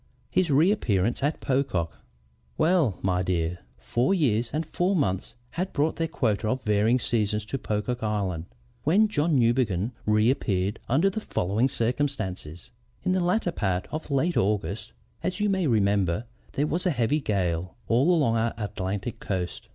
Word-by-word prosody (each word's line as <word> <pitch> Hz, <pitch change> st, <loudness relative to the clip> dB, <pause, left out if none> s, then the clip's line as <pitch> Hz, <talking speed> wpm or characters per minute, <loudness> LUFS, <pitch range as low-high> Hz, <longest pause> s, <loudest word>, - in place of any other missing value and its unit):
HIS 185 Hz, -3 st, +2 dB
REAPPEARANCE 135 Hz, -, +2 dB
AT 145 Hz, +3 st, 0 dB
POCOCK 130 Hz, -, 0 dB, 0.7 s
"Well, 155 Hz, -, +3 dB
my 90 Hz, -1 st, +1 dB
dear, 90 Hz, -1 st, -1 dB, 0.2 s
four 125 Hz, +11 st, +1 dB
years 120 Hz, -, +1 dB
and 155 Hz, +3 st, -1 dB
four 180 Hz, +5 st, 0 dB
months 105 Hz, -, -1 dB, 0.2 s
had 185 Hz, +2 st, -3 dB
brought 150 Hz, +3 st, +1 dB
their 165 Hz, -, 0 dB
quota 110 Hz, -, 0 dB
of 130 Hz, +4 st, -1 dB
varying 105 Hz, +3 st, +3 dB
seasons 105 Hz, -3 st, 0 dB
to 135 Hz, +5 st, -4 dB
Pocock 110 Hz, +3 st, -2 dB
Island 100 Hz, -6 st, -1 dB, 0.4 s
when 200 Hz, +9 st, +4 dB
John 155 Hz, -5 st, +1 dB
Newbegin 115 Hz, -4 st, +2 dB, 0.2 s
reappeared 105 Hz, -3 st, +1 dB
under 160 Hz, +11 st, +3 dB
the 220 Hz, -, -3 dB
following 110 Hz, -, 0 dB
circumstances: 110 Hz, -, -2 dB, 0.3 s
"In -, -, +1 dB
the 185 Hz, -, +2 dB
latter 180 Hz, +1 st, +1 dB
part 95 Hz, -, -1 dB
of 155 Hz, 0 st, -5 dB
last 155 Hz, +5 st, +1 dB
August, 105 Hz, +1 st, -1 dB, 0.3 s
as 185 Hz, +2 st, -2 dB
you 210 Hz, 0 st, +2 dB
may 190 Hz, -4 st, +1 dB
remember, 100 Hz, -3 st, +2 dB, 0.3 s
there 145 Hz, -, +1 dB
was 175 Hz, +5 st, -1 dB
a -, -, +4 dB
heavy 135 Hz, 0 st, +1 dB
gale 90 Hz, -5 st, -1 dB
all 125 Hz, +8 st, +3 dB
along 140 Hz, -10 st, +3 dB
our 115 Hz, +1 st, 0 dB
Atlantic 105 Hz, +1 st, -4 dB
coast. 90 Hz, -3 st, -4 dB
115 Hz, 155 wpm, -26 LUFS, 100-155 Hz, 0.7 s, when